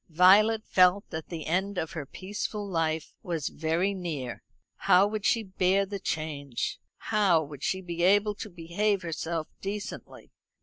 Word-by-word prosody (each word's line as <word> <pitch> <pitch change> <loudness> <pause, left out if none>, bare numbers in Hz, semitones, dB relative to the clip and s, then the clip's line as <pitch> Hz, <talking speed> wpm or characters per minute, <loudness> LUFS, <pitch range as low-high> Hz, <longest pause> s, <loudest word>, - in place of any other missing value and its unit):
Violet 205 +6 +5
felt 185 +2 +4
that 160 0 -6
the 165 -3 -5
end 190 +4 -1
of 160 -3 -2
her 150 -4 -6
peaceful 205 +3 -5
life 160 -3 -1
was 165 -5 -2
very 165 +5 0
near. 160 -10 -5 0.4
How 185 +2 +5
would 210 0 -1
she 230 - +2
bear 190 0 +1
the 200 0 -5
change? 145 -7 -3 0.2
How 195 -7 +2
would 145 -2 -10
she 190 +5 -1
be 175 -2 -5
able 205 +3 +4
to 210 - -7
behave 185 +3 -1
herself 165 -1 -3
decently? 205 +1 -6
180 Hz, 155 wpm, -28 LUFS, 160-200 Hz, 0.4 s, Violet